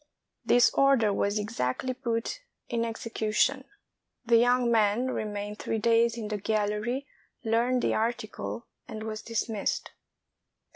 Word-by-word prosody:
This 245 0 +5
order 270 -7 +4
was 200 +1 0
exactly 210 - -2
put 235 - -2 0.3
in 230 -1 0
execution. 230 +3 0 0.6
The 235 0 +5
young 245 0 +3
man 225 +3 +2
remained 210 -1 -4
three 225 - -2
days 230 +1 +3
in 215 -2 -4
the 210 - -1
gallery, 215 +5 -1 0.4
learned 235 +3 +1
the - - +2
article, 215 - -3 0.2
and 220 -1 -6
was 215 -1 -5
dismissed. 225 -2 -2
225 Hz, 125 wpm, -28 LUFS, 210-240 Hz, 0.6 s, This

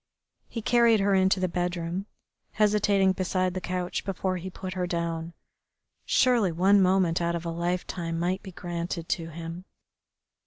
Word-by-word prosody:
He 230 - -5
carried 235 -2 +4
her 200 0 +2
into 190 0 +3
the 185 - +1
bedroom, 175 +2 -2 0.5
hesitating 205 -2 +3
beside 185 0 0
the 185 - -4
couch 180 0 -3
before 190 -1 -2
he 180 +2 -6
put 185 0 -6
her 180 -1 -2
down. 170 -1 -3 0.7
Surely 240 -8 +3
one 195 +4 +4
moment 185 -2 +3
out 170 0 0
of 170 0 -5
a 170 - -2
lifetime 170 0 -2
might 180 +3 -1
be 190 - -9
granted 170 -1 -4
to 165 -1 -1
him. 165 +2 -7
180 Hz, 155 wpm, -27 LUFS, 170-195 Hz, 0.7 s, carried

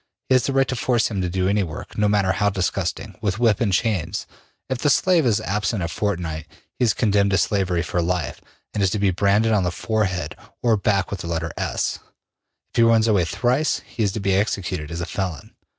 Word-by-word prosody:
He - - +4
has 130 -2 +3
the 135 - -1
right 135 -1 +3
to 130 - -2
force 120 -1 +1
him 100 -3 -1
to 90 - -1
do 95 +1 0
any 100 +1 +2
work, 80 -5 -6
no 105 - +2
matter 100 -2 +2
how 105 +1 +2
disgusting, 95 +1 -2
with 100 -2 -1
whip 115 -3 +2
and 110 -4 +2
chains. 95 -3 0 0.4
If 130 -2 -2
the 145 - +2
slave 170 -1 +3
is 110 -2 +3
absent 105 -2 -1
a - - -1
fortnight, 85 -4 -3 0.3
he 125 - +3
is 110 - +2
condemned 100 -3 +2
to 95 - +2
slavery 95 -5 +1
for 90 0 -1
life 85 -3 -2 0.3
and 105 - -1
is 95 - +3
to 105 - -1
be 100 -2 +2
branded 100 +4 +2
on 95 -5 +2
forehead 95 -3 -2 0.3
or 115 -2 +4
back 100 -2 0
with 100 - -3
the 85 - -6
letter 80 -1 -2
S; - - -2 0.7
if - - -7
he - - +5
runs 115 -1 +5
away 100 -6 +3
thrice, 130 - 0
he - - -6
is 100 -2 +2
to 110 - -3
be 100 -1 +1
executed 95 -5 -1
as 85 +1 -4
a - - -2
felon. 90 -7 -4
100 Hz, 225 wpm, -22 LUFS, 90-110 Hz, 0.7 s, he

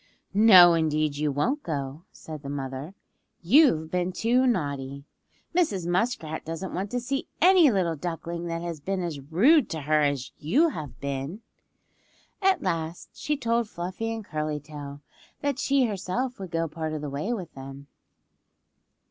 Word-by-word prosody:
"No 190 -5 +8
indeed 155 -2 +1
you 150 0 0
won't 245 - 0
go," 145 - -4
said 155 -2 -9
the 140 - -7
mother. 140 +4 -5 0.5
"You've 170 - +4
been 180 0 0
too 240 +7 +2
naughty. 140 - -2 0.5
Mrs. 300 - +1
Muskrat 175 -4 -1
doesn't 165 +4 -5
want 195 +3 -3
to 245 - -1
see 270 +3 -3
any 360 -3 +7
little 185 -7 +1
duckling 170 +2 -5
that 165 0 -3
has 170 -3 -4
been 190 +4 -2
as 165 -5 -4
rude 220 - +4
to 160 - -4
her 150 +2 +2
as 140 -4 0
you 280 - +3
have 145 - -7
been." 140 - -4 1.0
At 385 -1 +3
last 165 +1 -3
she 300 0 -2
told 235 -3 0
Fluffy 185 +6 -4
and 225 -2 -5
Curly 155 -3 -3
Tail 145 -1 -9 0.4
that 285 -2 -1
she 275 -2 +3
herself 215 +4 -3
would 190 -2 -6
go 165 0 -1
part 155 0 -4
of 155 - -4
the 150 - -4
way 150 +11 -2
with 185 -9 -4
them. 135 +1 -9
170 Hz, 160 wpm, -26 LUFS, 150-225 Hz, 1.0 s, No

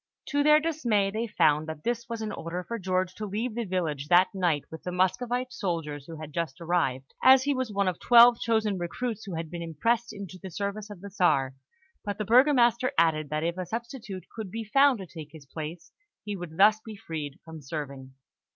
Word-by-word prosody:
To 285 0 +1
their 300 +1 +6
dismay, 240 -11 0
they 225 +3 -2
found 155 -6 +2
that 160 -1 -7
this 235 0 -2
was 230 -1 -4
an 215 - -3
order 170 +2 -5
for 235 +5 -5
George 185 -1 -1
to 215 +1 -6
leave 215 +4 -3
the 235 0 -3
village 160 -7 -2
that 180 +4 +5
night 175 -7 +1
with 160 - -8
the 180 - -5
Muscovite 240 +8 0
soldiers 150 -7 -3
who 165 -1 -8
had 155 -1 -9
just 165 -5 -3
arrived, 160 -6 -1
as 260 0 +7
he 285 +1 +1
was 260 -4 -2
one 200 -1 0
of 185 - -1
twelve 240 0 +7
chosen 220 -4 0
recruits 220 +6 -4
who 190 -4 -5
had 165 0 -5
been 170 -1 -5
impressed 230 +9 0
into 195 -3 -9
the 190 - -7
service 200 +3 -4
of 200 -4 -10
the 200 0 -9
Czar; 135 -9 +2 0.5
but 205 -1 -4
the 215 - -3
Burgomaster 250 +1 +4
added 155 -3 +2
that 155 +1 -2
if 170 +2 -2
a 185 - -2
substitute 230 -3 -6
could 220 -4 -5
be 225 +4 -5
found 275 +4 +4
to 190 - -7
take 160 -3 -10
his 155 -3 -12
place, 160 +4 -7 0.3
he 210 -1 -4
would 175 -4 -8
thus 210 +2 +5
be 220 -1 -8
freed 155 -7 -6
from 160 -1 -9
serving. 135 -2 -7
190 Hz, 215 wpm, -27 LUFS, 160-230 Hz, 0.5 s, as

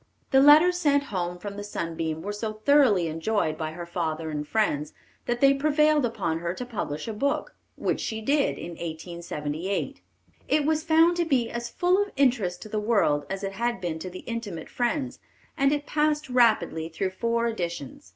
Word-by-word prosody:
The 265 - +6
letters 315 +6 +7
sent 285 -4 +3
home 175 -1 -2
from 200 +2 -7
the 205 - -5
Sunbeam 165 -5 -4
were 205 - -3
so 215 +1 -3
thoroughly 215 -5 +4
enjoyed 160 +1 -1
by 155 0 -4
her 175 +1 -6
father 165 -2 -3
and 150 -1 -4
friends, 150 -9 0 0.3
that 240 0 -1
they 275 0 +7
prevailed 300 -1 +3
upon 165 -8 -2
her 170 +1 -3
to 250 - -5
publish 180 -10 -4
a 225 - -3
book, 280 +7 -1 0.2
which - - -1
she 220 - -3
did 280 +6 +1
in - - -7
1878. 170 +1 -4 0.5
It 295 -1 +2
was 315 0 +1
found 330 +2 +4
to 345 - +1
be 255 -7 +1
as 235 0 -4
full 365 +6 +2
of 410 - -2
interest 240 -10 +1
to 215 - -10
the 215 - -1
world 205 -10 +1
as 195 +1 -4
it 195 - -2
had 235 +2 -1
been 170 -3 -3
to 185 - -6
the 185 +1 -9
intimate 220 -9 -5
friends, 255 +2 -2 0.4
and 275 0 +3
it 290 0 -1
passed 300 -2 0
rapidly 220 -9 +2
through 185 +3 -2
four 230 +4 0
editions. 170 - -4
215 Hz, 190 wpm, -26 LUFS, 170-275 Hz, 0.5 s, letters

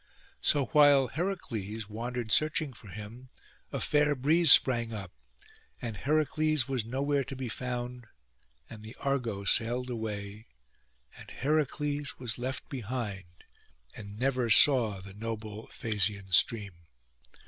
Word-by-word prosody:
So 145 -2 +2
while 140 -1 +5
Heracles 115 - -4
wandered 115 +1 -5
searching 155 -1 +2
for 110 - -15
him, 110 +5 -10 0.4
a - - -3
fair 150 0 +2
breeze 155 +4 +4
sprang 120 -3 +6
up, 100 -4 -7 0.7
and 115 -3 -5
Heracles 155 0 +1
was 130 -4 -1
nowhere 140 +4 -1
to 135 +1 -8
be 130 -2 -5
found; 125 0 -5 0.6
and 110 - -11
the 110 +2 -10
Argo 125 -8 -2
sailed 120 +4 0
away, 105 -1 -6 0.7
and - - -12
Heracles 145 0 -2
was 120 -2 -4
left 130 +2 -4
behind, 105 -8 -6 0.5
and 100 -1 -10
never 125 -2 0
saw 115 -5 +6
the 95 +1 -11
noble 110 0 -6
Phasian 105 -3 -1
stream. 100 +1 +2
120 Hz, 125 wpm, -29 LUFS, 110-140 Hz, 0.7 s, sprang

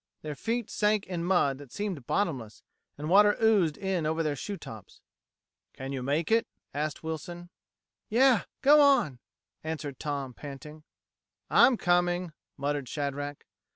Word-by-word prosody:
Their 155 -1 -4
feet 230 - -3
sank 210 -1 +1
in 175 -2 -4
mud 145 -7 +2
that 140 -4 -12
seemed 190 - -4
bottomless, 130 - -2 0.3
and 150 +1 -5
water 205 +4 +5
oozed 205 -9 +3
in 190 -5 -1
over 160 +1 0
their 150 -2 -1
shoe 200 +9 -5
tops. 110 - -11 0.7
"Can 135 +1 -6
you 135 -2 -3
make 145 - -1
it?" 230 +1 +3 0.3
asked 150 +2 -3
Wilson. 175 +2 -6 0.6
"Yeh 250 0 +4 0.2
go 295 +2 +7
on," 270 - +4 0.4
answered 155 -4 -5
Tom, 140 -3 -3
panting. 150 +3 -10 0.7
"I'm 250 - +6
coming," 175 -2 +1 0.2
muttered 140 -2 -2
Shadrack. 145 0 -4
160 Hz, 140 wpm, -29 LUFS, 145-195 Hz, 0.7 s, go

